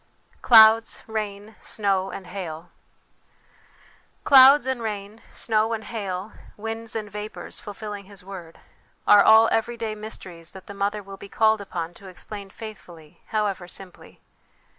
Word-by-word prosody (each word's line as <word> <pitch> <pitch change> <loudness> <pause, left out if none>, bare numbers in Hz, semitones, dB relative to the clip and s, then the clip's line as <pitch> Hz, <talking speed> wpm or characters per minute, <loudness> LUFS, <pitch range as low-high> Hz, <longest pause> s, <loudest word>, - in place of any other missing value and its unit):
Clouds, 225 -1 +6
Rain, 210 -1 -5
Snow, 195 -2 -1
and 195 - -8
Hail. 175 -3 -7 1.5
"Clouds 270 0 +8
and 260 -2 -2
rain, 210 0 -5
snow 220 0 0
and 220 -1 -4
hail, 200 -2 -5 0.3
winds 225 +1 -6
and 215 -2 -3
vapours, 210 +1 -7
fulfilling 205 -1 -8
His 200 -1 -12
word" 180 -4 -10 0.5
are 205 - +7
all 220 +1 +7
everyday 225 -1 -1
mysteries 185 -6 -8
that 190 -1 -12
the 200 - -9
mother 200 +1 -2
will 195 0 -10
be 200 - -11
called 220 0 +2
upon 175 -4 -5
to 195 +3 -14
explain 200 +2 -9
faithfully, 180 -8 -12
however 205 -4 -2
simply. 185 0 -10
205 Hz, 135 wpm, -24 LUFS, 190-220 Hz, 1.5 s, Clouds